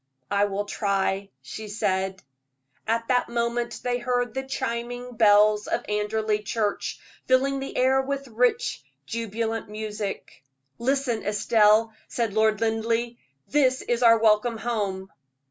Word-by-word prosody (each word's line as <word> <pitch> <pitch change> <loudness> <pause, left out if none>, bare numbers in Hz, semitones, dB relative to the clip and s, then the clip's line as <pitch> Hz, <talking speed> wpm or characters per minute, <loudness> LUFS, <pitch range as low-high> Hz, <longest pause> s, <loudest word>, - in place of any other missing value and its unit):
"I 200 0 +3
will 205 0 -2
try," 195 -1 -1
she 215 +11 -7
said. 190 -2 -1 0.6
At 230 +1 0
that 250 -1 +2
moment 235 0 -2
they 245 0 0
heard 245 -1 -1
the 265 - -2
chiming 245 -2 -4
bells 210 -1 +5
of - - -1
Anderley 210 +1 0
Church, 210 0 -2 0.3
filling 270 +1 +2
the 270 - -6
air 265 +1 +4
with 275 0 -4
rich, 245 - 0 0.2
jubilant 225 -1 -3
music. 210 -7 -5 0.4
"Listen, 255 -2 0
Estelle," 215 +1 +3
said 230 -4 -2
Lord 220 0 +2
Linleigh; 230 +1 0 0.3
"that 260 -3 +3
is 240 0 0
our 230 -1 +7
welcome 225 +1 +3
home." 200 -5 -3
225 Hz, 130 wpm, -25 LUFS, 210-245 Hz, 0.6 s, our